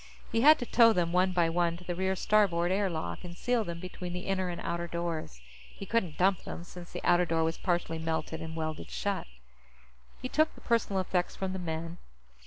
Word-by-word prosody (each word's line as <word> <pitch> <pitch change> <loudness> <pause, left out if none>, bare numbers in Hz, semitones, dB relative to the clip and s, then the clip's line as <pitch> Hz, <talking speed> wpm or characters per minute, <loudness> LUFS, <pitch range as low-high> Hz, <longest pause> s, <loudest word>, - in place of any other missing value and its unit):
He 225 - +2
had 305 +4 +8
to 245 - -4
tow 230 -1 +6
them, 175 -2 0
one 185 +1 +3
by 175 -2 +3
one, 170 0 +1
to 180 - -13
the 175 - -3
rear 190 +2 0
starboard 185 -4 +3
air 195 0 +2
lock 160 - -4
and 175 -1 -8
seal 245 -2 +1
them 170 -3 -5
between 180 0 -6
the 180 +1 -5
inner 190 -1 0
and 175 - -4
outer 170 0 -2
doors. 165 - -4 0.3
He 195 - -9
couldn't 190 -7 0
dump 190 0 +3
them, 170 - -6
since 175 0 -11
the - - -6
outer 175 0 +4
door 165 0 +1
was 165 +1 -1
partially 175 -3 -1
melted 160 0 -2
and 160 0 -6
welded 155 -1 -4
shut. 200 -2 -2 0.9
He 255 - -4
took 310 +4 +2
the - - -15
personal 225 -5 +1
effects 180 -1 -1
from 190 -1 -3
the 190 - -4
men. 165 0 -4
175 Hz, 215 wpm, -30 LUFS, 170-190 Hz, 0.9 s, had